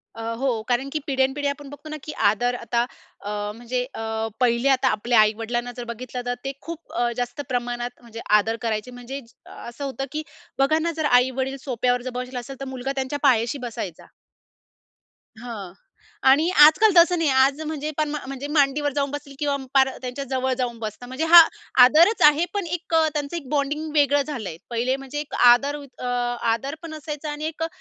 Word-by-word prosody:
अ, 225 - -7 0.2
हो. 255 -4 0
कारण 260 +3 0
की 310 - 0
पिढ्यानपिढ्या 270 +1 +1
आपण 280 0 -9
बघतो 290 +2 -11
ना, 305 - -5
की 305 - -6 0.2
आदर 245 +3 -1
आता 235 0 -1 0.4
अ, 205 0 -3
म्हणजे 245 +1 -3
अ - - -6 0.4
पहिले 245 +1 +2
आता 265 -1 +3
आपल्या 230 +2 +2
आई-वडिलांना 230 +3 +1
जर 245 - -4
बघितलं 250 +1 -6
तर 245 - -1
ते 270 - -2
खूप 335 0 -9
अ, 240 0 0
जास्त 245 +3 -3
प्रमाणात 245 0 -3
म्हणजे 230 -1 -10 0.2
आदर 225 +2 -1
करायचे, 225 +1 -2
म्हणजे 245 +2 -7 0.3
असं 240 +4 -9
होतं 270 0 -4
की 310 +1 -3 0.4
बघा 310 +4 +3
ना, 335 +1 -1
जर 315 - 0
आई-वडील 260 +1 +2
सोफ्यावर 250 -1 0
जर 255 - -5
बसेल 250 0 -6
असेल 265 +2 -7
तर 275 - -5
मुलगा 260 0 -4
त्यांच्या 270 +2 -2
पायाशी 240 -1 +3
बसायचा. 195 -7 -7 1.4
हां. 210 -7 -7 0.6
आणि 305 +6 +5
आजकाल 375 +9 +7
तसं 345 +1 +6
नाही 325 -3 +1
आज 270 +2 +3
म्हणजे 305 -1 -3
पण 305 -1 0 0.2
म्हणजे 275 +1 -5
मांडीवर 290 -1 +2
जाऊन 280 -1 0
बसतील 290 -1 -7
किंवा 290 -1 0 0.2
पार 265 -1 +5
त्यांच्याजवळ 260 0 -2
जाऊन 240 -3 -3
बसतात. 220 +2 -6
म्हणजे 260 +6 -2
हा 345 - +13 0.4
आदरच 330 - +5
आहे, 300 +3 0
पण 405 -3 -2
एक 340 0 -5
त्यांचं 310 -1 +1
एक 280 - -8
बॉन्डिंग 300 +2 -1
वेगळं 285 -1 +4
झालंय. 225 - -5
पहिले 240 +3 0
म्हणजे 275 +2 -6
एक 295 - -7 0.2
आदर 280 +4 0
युक 275 -3 -15
अ, - - -4 0.5
आदर 270 +6 -4
पण 325 - -7
असायचा 300 -1 -5
आणि 295 +1 -5
एक 320 0 -4
अ, - - 0
270 Hz, 185 wpm, -23 LUFS, 245-295 Hz, 1.4 s, हा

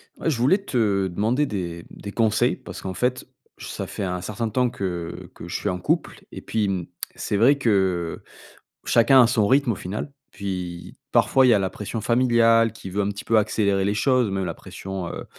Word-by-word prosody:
Ouais, 165 - -2
je 135 - 0
voulais 130 +11 +4
te 110 - 0
demander 110 +10 +1
des 85 - -5
des 100 - -9
conseils, 110 -1 +2
parce - - -10
qu'en 95 - -4
fait, 125 +5 -1 0.3
ça - - -6
fait - - -5
un 90 -1 -2
certain 105 +5 -3
temps 125 +3 +1
que 90 -6 -5
que - - -9
je - - -5
suis - - -1
en 90 - -2
couple 90 - -2
et - - -8
puis, 110 -2 -1
mmh, 90 -3 -2 0.3
c'est 105 - -2
vrai 130 +7 +5
que 95 -9 0 0.6
chacun 125 +3 +6
a - - +4
son 110 -4 +2
rythme 135 0 +3
au - - -5
final. 100 +10 -5 0.2
Puis 90 -3 -5 0.2
parfois, 130 -1 +4
il - - +5
y - - +7
a - - +5
la 95 -1 -1
pression 105 +2 -5
familiale, 115 -1 +4
qui 95 - -9
veut 100 +2 0
un 100 - 0
petit 100 0 -6
peu 115 - +3
accélérer 100 -2 +1
les 100 - +1
choses, 125 +1 +2
même 95 -1 -2
la 85 - -3
pression, 95 +2 -7
heu, - - -6
105 Hz, 210 wpm, -23 LUFS, 95-120 Hz, 0.6 s, y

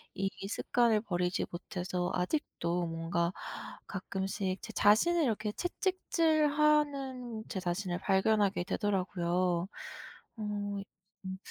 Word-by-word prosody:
이 195 0 0 0.2
습관을 225 +1 +2
버리지 180 -4 0
못해서 180 0 -3
아직도 180 - -1
뭔가 165 +1 0 0.6
가끔씩 190 0 -2
제 - - -7
자신을 325 +12 +5
이렇게 215 -5 0
채찍질하는 300 - +1
제 190 - -2
자신을 180 0 -1
발견하게 200 -1 +3
되더라고요. 180 -3 0 0.7
어 215 - -3 0.8
음 190 0 -4
195 Hz, 235 characters per minute, -32 LUFS, 180-250 Hz, 0.8 s, 자신을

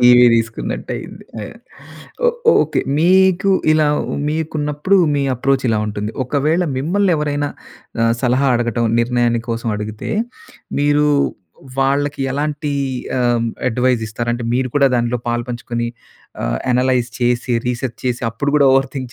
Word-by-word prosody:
TV 125 0 +7
తీసుకున్నట్టు 115 -1 -2
అయింది. - - -9 0.2
అ! - - -4 0.8
ఓహ్! 480 0 +1 0.3
Okay. - - -1 0.2
మీకూ 190 +3 +4 0.2
ఇలా 155 -1 +3 0.4
మీకున్నప్పుడు 155 +3 0 0.2
మీ 140 - +1
అప్రోచ్ 135 +2 0
ఇలా 110 -1 +2
ఉంటుంది. 105 +1 -3
ఒకవేళ 150 +7 +1
మిమ్మల్ని 185 +6 +1
ఎవరైనా 145 -1 -1 0.5
ఆహ్, 115 0 +3
సలహా 130 +2 +2
అడగటం, 120 0 -1 0.2
నిర్ణయాన్ని 120 -1 +1
కోసం 115 0 -2
అడిగితే 105 0 -5 0.7
మీరు 145 +1 +3 0.7
వాళ్ళకి 140 +1 +1
ఎలాంటి 145 +1 -2 0.5
ఆహ్, 125 - +1
హ్మ్, 115 - -1 0.2
అడ్వైస్ 125 -1 +1
ఇస్తారంటే 120 +2 -3
మీరు 130 +1 0
కూడా 140 -1 +5
దాంట్లో 120 0 0
పాలుపంచుకుని, 120 0 -3 0.5
ఆహ్, - - -1
అనలైజ్ 125 -1 +1
చేసి, 120 0 +1
రీసెర్చ్ 125 0 -3
చేసి 120 0 -1
అప్పుడు 140 +5 -2
కూడా 140 -2 +5
ఓవర్ 135 0 +2
థింక్ 130 -3 -5
130 Hz, 130 wpm, -18 LUFS, 120-145 Hz, 0.8 s, TV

